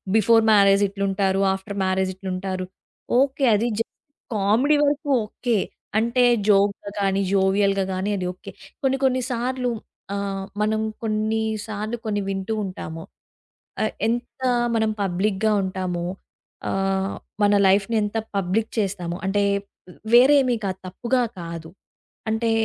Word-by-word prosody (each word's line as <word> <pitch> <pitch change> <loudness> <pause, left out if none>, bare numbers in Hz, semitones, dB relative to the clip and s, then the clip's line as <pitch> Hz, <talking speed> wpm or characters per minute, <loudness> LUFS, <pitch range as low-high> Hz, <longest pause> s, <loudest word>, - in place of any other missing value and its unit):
Before 225 +1 +5
marriage 200 -1 +5
ఇట్లుంటారు. 195 -1 0
After 195 +1 -6
marriage 190 0 +1
ఇట్లుంటారు. 185 0 -4 0.5
Okay. 275 0 +2
అది 225 +3 +1
జే 230 - +1 0.5
comedy 220 +9 +3
వరకు 290 +1 0 0.2
okay. 230 +2 -1 0.4
అంటే 235 +3 +2 0.3
జోక్‌గా 200 0 +3
కానీ, 195 0 +1
జోవియల్‌గా 195 0 +2
గానీ 190 +2 -2
అది 185 - -3
ఓకే. 185 - -11 0.3
కొన్ని 270 0 +2
కొన్ని 255 -1 +2
సార్లు 250 +1 -1 0.4
ఆహ్, 195 -1 -3 0.2
మనం 215 +1 +1 0.2
కొన్నిసార్లు 215 0 -2
కొన్ని 205 -1 -1
వింటూ 195 +2 -2
ఉంటాము. 165 -3 -7 0.8
అ - - +2 0.2
ఎంత 240 +3 -3 0.3
మనం 220 -1 +2
పబ్లిక్‌గా 195 +3 +1
ఉంటామో, 185 -2 -3 0.7
ఆహ్, 195 0 0 0.3
మన 205 0 +4
లైఫ్‌ని 195 +4 +3
ఎంత 210 +2 -2 0.2
పబ్లిక్ 195 +4 0
చేస్తామో, 180 -4 -2
అంటే 205 +1 +2 0.7
వేరేమీ 255 0 +6
కా 195 - 0
తప్పుగా 235 +7 -1 0.2
కాదు. 165 -1 -7 0.6
అంటే 225 +1 +1
205 Hz, 120 wpm, -23 LUFS, 190-225 Hz, 0.8 s, వేరేమీ